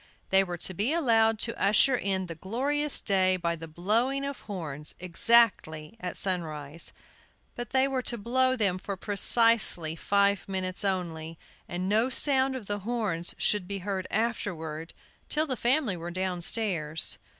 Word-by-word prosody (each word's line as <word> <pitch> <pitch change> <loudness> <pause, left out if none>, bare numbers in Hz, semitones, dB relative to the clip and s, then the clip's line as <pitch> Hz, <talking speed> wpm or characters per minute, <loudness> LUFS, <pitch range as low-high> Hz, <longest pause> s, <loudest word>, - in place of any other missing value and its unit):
They 190 0 +5
were 175 -2 -5
to 185 - -3
be 210 - 0
allowed 225 -8 +3
to 230 - 0
usher 220 +6 +4
in 195 -5 -1
the 170 - -6
glorious 270 - 0
day 185 -2 +2
by 170 -1 -1
the 165 0 -9
blowing 230 - 0
of 280 -1 -5
horns 150 -7 -6
exactly 180 -3 +2
at 180 - -5
sunrise. 165 -4 -2 0.6
But 240 -2 -6
they 265 +1 +3
were 265 -2 -1
to 240 -1 -2
blow 255 +4 +1
them 195 -6 0
for 195 +1 -5
precisely 205 -5 +3
five 200 +2 +1
minutes 185 0 -3
only, 165 -4 -3 0.3
and 180 +1 -3
no 220 +5 +2
sound 265 0 +2
of 250 -5 -6
the 205 +1 -3
horns 205 -6 -2
should 205 -4 +1
be 200 0 -4
heard 190 -1 -4
afterward 170 -8 -3 0.3
till 310 +1 +2
the 265 -4 -2
family 245 -3 +1
were 170 0 -6
downstairs. 180 -2 -1
200 Hz, 155 wpm, -28 LUFS, 175-235 Hz, 0.6 s, They